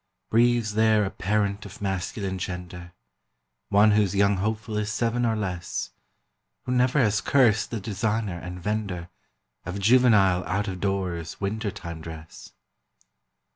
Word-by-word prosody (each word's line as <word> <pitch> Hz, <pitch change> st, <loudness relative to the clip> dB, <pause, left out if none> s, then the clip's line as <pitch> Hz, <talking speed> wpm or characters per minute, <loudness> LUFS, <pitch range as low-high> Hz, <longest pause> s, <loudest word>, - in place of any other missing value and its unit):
Breathes 120 Hz, -1 st, +3 dB
there 110 Hz, -1 st, +3 dB
a 95 Hz, -, -3 dB
parent 100 Hz, 0 st, -1 dB
of 100 Hz, -, -11 dB
masculine 95 Hz, 0 st, -3 dB
gender, 90 Hz, -1 st, -6 dB, 0.8 s
One 105 Hz, +2 st, +5 dB
whose 105 Hz, -2 st, +2 dB
young 100 Hz, 0 st, +3 dB
hopeful 110 Hz, +2 st, -2 dB
is 105 Hz, 0 st, -1 dB
seven 115 Hz, +3 st, 0 dB
or 115 Hz, -, +1 dB
less, 90 Hz, -5 st, -3 dB, 0.7 s
Who 125 Hz, -, -4 dB
never 125 Hz, +2 st, +2 dB
has 105 Hz, -6 st, +3 dB
cursed 115 Hz, -7 st, +3 dB
the 115 Hz, -, -3 dB
designer 105 Hz, -2 st, -2 dB
and 90 Hz, +1 st, -7 dB
vender 95 Hz, -3 st, -3 dB, 0.5 s
Of 90 Hz, +3 st, -5 dB
juvenile 100 Hz, -5 st, +4 dB
out 100 Hz, +2 st, -1 dB
of 95 Hz, -2 st, -4 dB
doors 95 Hz, -4 st, -2 dB
winter 105 Hz, +2 st, -2 dB
time 85 Hz, -4 st, -7 dB
dress? 80 Hz, 0 st, -10 dB
100 Hz, 135 wpm, -25 LUFS, 90-110 Hz, 0.8 s, One